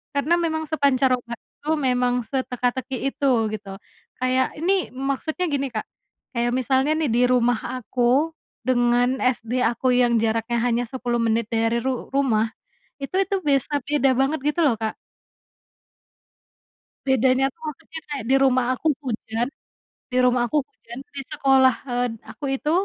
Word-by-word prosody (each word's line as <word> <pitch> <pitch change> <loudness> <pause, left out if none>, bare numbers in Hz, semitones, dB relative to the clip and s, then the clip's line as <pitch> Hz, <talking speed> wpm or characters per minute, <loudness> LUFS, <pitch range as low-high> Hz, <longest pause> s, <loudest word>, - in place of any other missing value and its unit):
karena 285 +4 +2
memang 315 -1 -1
sepancaroba 260 -5 +1
itu 295 - -20
memang 250 -3 +1
seteka-teki 255 0 -2 0.2
itu 280 - +1 0.2
gitu. 195 -2 -6 0.4
Kayak 255 0 +2
ini 370 +4 +1
maksudnya 275 +6 -2
gini 275 -1 0
Kak, 220 -3 -4 0.5
kayak 240 0 +1
misalnya 265 +3 +2
nih 315 -3 0
di 240 - +3
rumah 245 -2 +3 0.2
aku, 255 +6 +1 0.3
dengan 245 0 +2
SD 250 0 0
aku 240 +3 +1
yang 245 -1 +3
jaraknya 225 +1 0
hanya 240 0 +1
10 245 -1 -2
menit 230 -1 0
dari 230 0 +1
ru 260 +1 -3
rumah, 240 -6 +2 0.5
itu 275 -1 -7
itu 390 +1 0
bisa 285 0 +1
beda 275 -3 +2
banget 270 +3 +1
gitu 325 +3 +1
loh 230 -7 +2
Kak. 220 -1 -2 2.1
Bedanya 265 0 +3
tuh 325 - -35
maksudnya 320 +2 -9
kayak 290 -4 -4
di - - +6
rumah 255 -2 +3
aku 260 - -3 0.2
hujan 230 0 -2 0.7
di 250 - -1
rumah 250 -1 +3
aku 300 - +1
hujan 235 +2 -12 0.2
di - - -3
sekolah, 265 -2 +4
eee, 245 0 0 0.2
aku 295 - -9
itu 300 - -2
255 Hz, 145 wpm, -23 LUFS, 240-275 Hz, 2.1 s, di